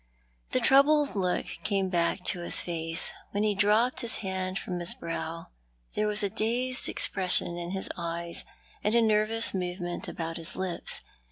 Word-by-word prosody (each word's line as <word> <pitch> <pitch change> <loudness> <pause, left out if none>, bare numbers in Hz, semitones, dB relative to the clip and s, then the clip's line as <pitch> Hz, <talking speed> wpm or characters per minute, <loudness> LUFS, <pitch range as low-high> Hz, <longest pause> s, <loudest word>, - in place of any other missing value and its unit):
The - - +1
troubled 285 - +4
look 180 -2 0 0.2
came 195 -2 0
back 175 0 0
to 180 - 0
his 175 - +1
face. 165 0 +1 0.2
When 205 +1 0
he 210 -1 +2
dropped 210 +6 +2
his 235 -2 0
hand 190 0 -3
from 180 -2 -4
his 175 0 -1
brow 165 0 -6 0.4
there 210 - 0
was 210 0 0
a 200 - +1
dazed 250 +5 +1
expression 180 -2 +2
in 175 0 -5
his 190 +1 -3
eyes, 170 0 -4 0.4
and 210 +2 +1
a 235 - +5
nervous 220 +1 +4
movement 180 -1 -4
about 165 -1 -5
his 165 -1 0
lips. 185 -2 0
190 Hz, 165 wpm, -28 LUFS, 175-215 Hz, 0.4 s, a